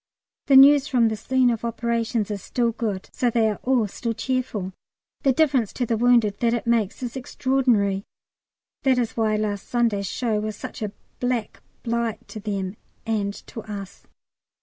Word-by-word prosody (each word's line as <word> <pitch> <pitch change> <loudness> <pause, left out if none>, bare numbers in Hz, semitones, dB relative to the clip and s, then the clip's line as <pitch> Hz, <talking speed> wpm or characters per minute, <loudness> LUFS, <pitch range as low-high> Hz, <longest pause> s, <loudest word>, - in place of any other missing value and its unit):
The 275 - +5
news 280 +1 +8
from 240 -5 +3
the 220 - -2
"scene 255 +3 +2
of 230 -1 -3
operations" 230 -2 -1
is 200 -2 -4
still 235 +3 0
good, 215 -4 -3
so 245 - +1
they 230 -1 +2
are 210 - -2
all 250 -4 +2
still 230 +3 -3
cheerful. 225 -6 -2 0.5
The 275 - +3
difference 260 -6 +2
to 245 - -1
the 230 - 0
wounded 230 -3 +3
that 235 0 +1
makes 235 -1 0
is 240 0 -4
extraordinary. 245 -7 +1 0.8
That 265 -2 +3
is 235 -3 -1
why 220 -2 +1
last 210 -2 -2
Sunday's 225 -5 +1
show 225 -2 -1
was 215 0 -3
such - - -8
a 210 -2 -2 0.3
black 245 -3 -2 0.2
blight 235 -1 -2
to 215 - -7
them 200 -1 -3 0.3
and 210 -3 0
to 225 - -8
us. 200 -2 -8
230 Hz, 170 wpm, -24 LUFS, 210-245 Hz, 0.8 s, news